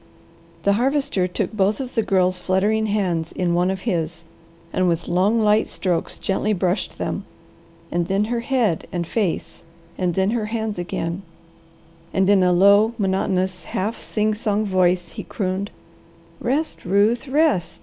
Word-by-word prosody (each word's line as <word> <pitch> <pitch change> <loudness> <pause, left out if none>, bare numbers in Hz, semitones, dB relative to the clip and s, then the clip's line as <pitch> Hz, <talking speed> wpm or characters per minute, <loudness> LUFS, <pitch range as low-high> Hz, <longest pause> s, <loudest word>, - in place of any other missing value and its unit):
The 200 - +4
Harvester 250 -5 +1
took 185 +2 -3
both 205 +2 +1
of 260 -2 -5
the 225 - +2
Girl's 185 -3 +2
fluttering 205 +4 +1
hands 180 -6 -1
in 175 -2 -1
one 175 +1 +2
of 190 -1 -3
his 170 -5 -2 0.5
and 185 0 +2
with 170 -1 0
long, 190 +6 +2
light 215 0 +3
strokes 180 -3 -2
gently 205 +2 0
brushed 185 0 -1
them, - - -3 0.7
and 175 -1 0
then 195 +2 +1
her 235 +2 -1
head, 235 - 0
and 175 -1 -2
face, 195 -1 -2 0.4
and 180 -2 0
then 190 +2 +2
her 225 -2 -1
hands 220 -3 -3
again, 175 0 -3 0.9
and 190 0 +3
in 200 -2 +5
a 180 0 +4
low, 200 +5 +5
monotonous, 190 -3 0
half 210 +9 -3
sing 215 0 0
song 210 0 -1
voice 180 -2 +2
he - - -7
crooned, 195 0 -3 0.7
"Rest, 285 +6 -1
Ruth, 205 +8 +2
rest! 285 - +1
195 Hz, 155 wpm, -22 LUFS, 180-215 Hz, 0.9 s, in